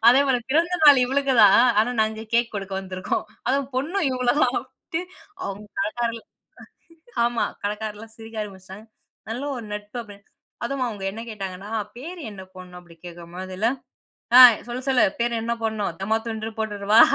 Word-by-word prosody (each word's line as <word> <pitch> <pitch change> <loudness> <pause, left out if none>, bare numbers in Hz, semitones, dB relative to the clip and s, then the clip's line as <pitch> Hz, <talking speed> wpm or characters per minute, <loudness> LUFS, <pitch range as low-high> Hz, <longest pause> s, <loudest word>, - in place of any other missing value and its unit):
அதேபோல 265 0 +5
பிறந்த 340 +5 +2
நாள் 285 -3 +9
இவளுக்கு 270 +1 +1
தான் 195 - +7 0.2
ஆனா 235 +3 +1
நாங்க 220 +1 -3
கேக் 235 -1 +2
கொடுக்க 195 -1 -5
வந்துருக்கோம். 185 +2 -3 0.2
அதுவும் 275 +1 0
பொண்ணும் 325 +5 0
இவுங்கள 250 -1 -2
தான் 250 0 +2
அப்பிடின்ட்டு, 325 - -6 0.4
அவுங்க 200 +2 -5
கடைக்காரர்கள் 240 -8 -2 1.0
ஆமா, 240 -1 0 0.2
கடைக்காரர்லாம் 210 +1 -5
சிரிக்க 225 0 -11
ஆரம்பிச்சுட்டாங்க, 195 +1 -11 0.4
நல்ல 245 +5 -4
ஒரு 230 - -7
நட்பு 210 +2 -7
அப்பிடின்னு. 205 -2 -14 0.4
அதுவும் 275 -2 -1
அவுங்க 205 -4 -6
என்ன 225 +3 -7
கேட்டாங்கன்னா, 195 -1 -6
அ, - - 0 0.2
பேரு 335 +7 -8
என்ன 190 -2 -9
போடணும் 180 -1 -11
அப்பிடி 170 -1 -17
கேட்கும்போதில்ல, 180 +4 -4 0.7
ஆ, 255 - +12 0.3
"சொல்லு, 250 +2 -4
சொல்லு, 260 -2 +4 0.2
பேரு 235 0 +1
என்ன 235 +1 -1
போட்ணும் 220 -2 -1
'தம்மா 215 +3 +1
துண்டுன்னு' 220 0 -5
போட்ருறவா?" 210 0 +3
220 Hz, 155 wpm, -24 LUFS, 200-255 Hz, 1.0 s, ஆ